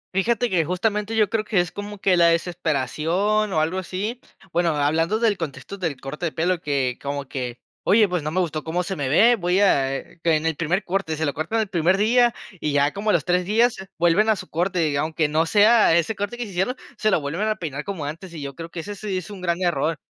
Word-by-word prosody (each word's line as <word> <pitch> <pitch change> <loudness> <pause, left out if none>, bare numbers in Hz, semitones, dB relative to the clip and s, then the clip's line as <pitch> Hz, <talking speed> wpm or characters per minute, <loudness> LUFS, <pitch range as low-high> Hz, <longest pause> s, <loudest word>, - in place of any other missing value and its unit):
Fíjate 235 +4 +1
que, 175 -3 +3
justamente, 210 +5 -1
yo 215 -2 +4
creo 215 +1 -1
que 210 -4 +1
es 175 -1 0
como 205 0 -7
que 190 -1 +2
la 170 - +6
desesperación 170 - 0
o 160 - +1
algo 175 +4 -1
así. 205 +7 -4 0.3
Bueno, 170 -2 +1
hablando 165 +8 +1
del 220 -4 +1
contexto 160 +5 -6
del 160 -7 -3
corte 150 +6 -4
de 160 - -4
pelo, 175 +1 0
que 135 -4 -1
como 140 0 -4
que 125 -2 -5 0.3
"Oye, 210 +1 +5
pues 180 -3 -1
no 150 - -3
me 180 - -1
gustó 160 -4 -2
cómo 175 +2 -1
se 190 +1 -4
me 140 -4 -2
ve". 230 - +5
Voy 180 +1 +1
a, 135 -9 +3
eh, - - -12
que 165 -2 +3
en 155 +1 -1
el 160 -2 +1
primer 175 +6 -1
corte, 180 -4 -2
se 160 - -1
lo 145 - -1
cortan 195 +9 -1
el 210 - -2
primer 180 +1 +2
día, 240 +3 +4 0.3
y 150 -1 -1
ya 145 +1 +2
como 210 +2 -2
a - - +4
los - - +1
3 180 -1 +2
días 225 +5 +3 0.2
vuelven 175 +6 +3
a 215 - +4
su - - -8
corte, 170 -3 0
aunque 155 0 0
no 160 +2 +1
sea 210 -4 +5
ese 170 +6 0
corte 205 +4 -4
que 245 - -3
se 205 - -9
hicieron, 190 +8 -1 0.2
se 215 0 +1
lo 190 - +3
vuelven 165 +9 -2
a 215 - +1
peinar 150 -7 -5
como 185 -8 -5
antes. 165 +5 -7
Y 150 - -6
yo 140 - -5
creo 165 +4 -8
que 165 - -6
ese 205 +5 -6
sí 200 -1 -4
es 185 +3 -6
un 190 -3 -9
gran 175 0 -1
error 160 -2 0
175 Hz, 250 wpm, -23 LUFS, 155-205 Hz, 0.3 s, la